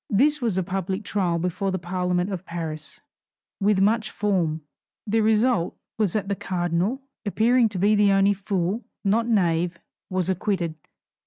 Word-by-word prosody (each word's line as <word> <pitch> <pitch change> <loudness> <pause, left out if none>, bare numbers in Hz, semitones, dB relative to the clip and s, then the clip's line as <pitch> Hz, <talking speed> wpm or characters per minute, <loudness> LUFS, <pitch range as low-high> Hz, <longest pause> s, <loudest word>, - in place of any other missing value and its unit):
This 290 +8 +3
was 225 -6 0
a 190 - +1
public 190 +2 -3
trial 185 -5 0
before 180 +3 -1
the 185 - -1
Parliament 180 +1 -1
of 185 -2 -4
Paris, 160 -3 -6 0.6
with 200 -1 +3
much 215 +2 +2
form. 175 -7 0 0.4
The 220 +1 +1
result 220 -3 +2 0.2
was 205 -5 +1
that 205 -2 -1
the 200 - 0
cardinal, 180 +8 -1 0.2
appearing 230 +3 +3
to 205 - -5
be 205 +1 +4
only 195 +1 +4
fool, 195 +2 -2 0.2
not 220 +3 +2
knave, 175 -5 +1 0.3
was 185 -2 -1
acquitted. 185 -3 -1
195 Hz, 150 wpm, -24 LUFS, 175-215 Hz, 0.6 s, be